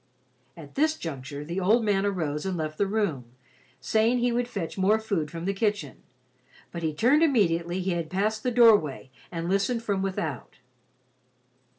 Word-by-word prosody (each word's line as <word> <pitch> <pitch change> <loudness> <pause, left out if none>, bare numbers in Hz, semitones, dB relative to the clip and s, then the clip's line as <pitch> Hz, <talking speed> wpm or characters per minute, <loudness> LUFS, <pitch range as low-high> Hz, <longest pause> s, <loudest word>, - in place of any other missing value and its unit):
At 150 -4 -11
this 310 +2 +1
juncture, 140 -2 -6
the 170 +4 -3
old 215 +6 +3
man 205 -1 +2
arose 155 -7 -2
and 190 -2 -2
left 155 -1 -4
the 200 - +2
room, 195 - -1 0.5
saving 225 - +2
he 245 0 +1
would 240 0 0
fetch 195 -9 -5
more 200 +3 +3
food 200 -9 -2
from 165 +2 -6
the 195 - 0
kitchen, 200 - -2 0.7
but 170 - -6
he 160 -1 0
turned 245 - +3
immediately 180 - +2
he 185 +1 -1
had 170 -2 -2
passed 210 +4 -1
the 250 - 0
doorway 210 - +4 0.2
and 165 -1 -4
listened 200 +5 0
from 200 -4 -1
without. 170 -8 -4
195 Hz, 170 wpm, -26 LUFS, 165-220 Hz, 0.7 s, doorway